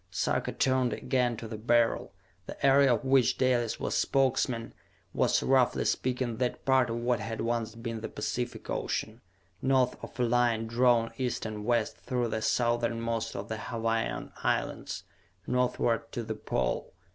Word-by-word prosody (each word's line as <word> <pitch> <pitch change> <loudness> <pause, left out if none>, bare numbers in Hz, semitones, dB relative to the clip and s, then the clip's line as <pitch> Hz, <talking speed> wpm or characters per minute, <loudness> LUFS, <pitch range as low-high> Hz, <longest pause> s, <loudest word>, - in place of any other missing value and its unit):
Sarka - - -1
turned 130 -2 +1
again 125 -3 0
to 115 - -6
the 110 -1 -6
Beryl. 120 -2 +2 0.4
The - - -4
area 135 -2 +6
of - - -6
which 130 -2 +4
Dalis 120 -3 +1
was - - -2
Spokesman 130 -3 +1 0.4
was, - - +2
roughly 130 -2 +3
speaking, 125 -2 -1
that 125 -1 -2
part 130 -3 +4
of 115 - -2
what 120 0 0
had 115 +1 -5
once 115 -1 -1
been 115 -1 -5
the - - -4
Pacific - - -4
Ocean, 110 +2 -3 0.4
north 130 -2 +2
of 125 - -9
a - - +3
line 120 -1 +2
drawn 115 0 +3
east 125 -3 -2
and 105 -1 -5
west 120 -2 +1
through 125 -2 -1
the 110 0 -2
southernmost 115 0 0
of 100 +1 -5
the 110 - -4
Hawaiian 115 0 -2
Islands, - - -1 0.4
northward 125 -2 0
to 120 - -3
the 110 - -3
Pole. 60 - -2
120 Hz, 155 wpm, -29 LUFS, 115-125 Hz, 0.4 s, area